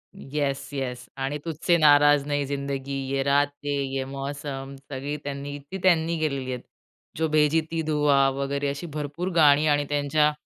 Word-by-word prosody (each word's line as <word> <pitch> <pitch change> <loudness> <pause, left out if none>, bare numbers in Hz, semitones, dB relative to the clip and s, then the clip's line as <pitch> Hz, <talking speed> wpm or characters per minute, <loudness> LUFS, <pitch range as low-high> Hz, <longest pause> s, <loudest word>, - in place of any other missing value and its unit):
Yes! 140 -1 -3
Yes! 130 -3 -4
आणि 135 +2 -2
तुझसे 165 +2 +1
नाराज 145 -2 +6
नहीं 145 -1 0
जिंदगी, 140 0 -4 0.2
ये 135 0 +1
रातें 145 +1 +1 0.2
ये 135 -1 -1
मौसम 140 0 -6
सगळी 140 +2 -4
त्यांनी 140 0 -5
ती 190 - -3
त्यांनी 170 -2 +3
केलेली 140 -4 -2
आहेत. 125 - -5 0.6
जो 160 - +1
भेजी 155 +1 +3
थी 165 -1 -1
दुआ 145 -3 +3
वगैरे 140 +1 -2
अशी 140 +5 -5
भरपूर 150 +5 -3
गाणी 150 -1 +6
आणि 145 -1 +2
त्यांच्या 150 +1 +2
145 Hz, 155 wpm, -25 LUFS, 140-150 Hz, 0.6 s, नाराज